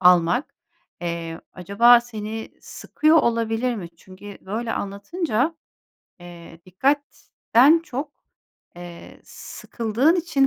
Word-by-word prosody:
almak, 180 - +3 0.5
eee, 170 -1 -5
acaba 215 +7 +5
seni 220 -2 -7
sıkıyor 310 +2 +1
olabilir 230 -1 +1
mi? 185 -6 -7
Çünkü 190 +3 -13
böyle 225 +4 -4
anlatınca, 255 - -2 0.6
eee, 170 -1 -13
dikkatten 275 - +2
çok, 285 +1 -5 0.6
eee, 175 -1 -11
sıkıldığın 240 - -1
için 315 -6 +1
225 Hz, 90 wpm, -22 LUFS, 180-270 Hz, 0.6 s, acaba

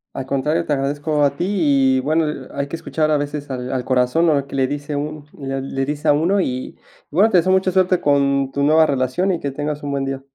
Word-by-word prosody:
Al 135 - -4
contrario, 150 +5 0
te 150 - 0
agradezco 145 +2 0
a 140 0 +1
ti 175 - -1
y, 140 -9 +2
bueno, 155 +4 +1 0.3
ha - - -7
hay 140 - -1
que 155 - -5
escuchar 160 -1 -1
a 150 - +3
veces 145 0 -4
al 125 -1 -4
al 130 -2 -2
corazón, 130 +6 +2
¿no?, 140 -3 +2
que 140 - -6
le 130 - +2
dice 145 +2 -5
uno, 150 0 -5
le 135 -1 -3
le 135 0 -3
dice 145 +1 -2
a - - +6
uno. 175 +7 +2
Y, 130 -5 -4 0.3
bueno 195 +8 +4
te 185 - +3
deseo 185 +2 +3
mucha 190 0 +2
suerte 185 -1 +2
con 140 -1 +2
tu 140 - -2
nueva 155 +2 +5
relación 140 +7 0
y 175 - -1
que 140 - -3
tengas 150 +1 -4
un 145 - -3
buen 140 -1 -1
día. 135 0 -4
145 Hz, 250 wpm, -20 LUFS, 135-160 Hz, 0.3 s, a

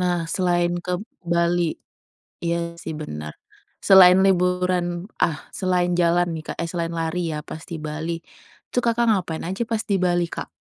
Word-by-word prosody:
Nah 175 -2 0
selain 175 -2 +1
ke 180 0 -2 0.2
Bali 170 -1 +1 0.7
iya 170 0 -1
sih 160 - -5
bener. 75 - -6 0.5
Selain 185 -2 +8
liburan 180 -1 +1
ah, 155 -3 +1
selain 180 -2 0
jalan 175 0 +3
nih, 155 - -6
Kak - - -19
eh, 170 - -4
selain 170 -1 -2
lari 165 +1 -1
ya - - -3
pas 160 - -8
di 170 - -5
Bali, 155 +2 -3 0.6
itu, - - +1
Kakak, 235 0 +2
ngapain 180 -6 -1
aja 190 +6 -2
pas 225 -1 -1
di 200 - 0
Bali, 175 -1 +2
Kak? - - -5
175 Hz, 165 wpm, -23 LUFS, 170-180 Hz, 0.7 s, Selain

